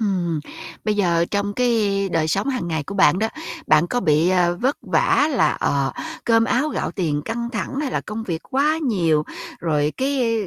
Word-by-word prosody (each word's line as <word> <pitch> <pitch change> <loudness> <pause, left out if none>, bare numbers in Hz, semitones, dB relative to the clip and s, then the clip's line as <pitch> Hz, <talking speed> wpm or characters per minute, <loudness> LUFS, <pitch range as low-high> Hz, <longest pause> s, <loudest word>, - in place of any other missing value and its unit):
Ừm, 180 -7 0 0.4
bây 215 0 +1
giờ 170 -4 +2
trong 205 0 -1
cái 210 -5 +1
đời 160 -1 +1
sống 195 - 0
hàng 255 -10 -2
ngày 160 -2 -1
của 200 - -7
bạn 190 -2 +4
đó, 220 +2 +1 0.4
bạn 155 +2 +4
có 245 +6 -1
bị, 155 -2 +3
ờ, 175 -1 +2
vất 265 +4 +1
vả 295 - +2
là, 265 - +3
ờ, 140 -1 +1 0.3
cơm 225 -1 +4
áo 260 +6 +1
gạo - - -2
tiền 155 -6 -1
căng 235 +1 -3
thẳng, 235 +3 -4
hay 290 -3 -2
là - - -1
công 215 +1 -6
việc 170 -6 -4
quá 290 +4 +2
nhiều, 170 - +1 0.4
rồi 150 -3 0
cái, 260 -4 0
ư, 205 - -4
200 Hz, 200 wpm, -21 LUFS, 170-240 Hz, 0.4 s, bạn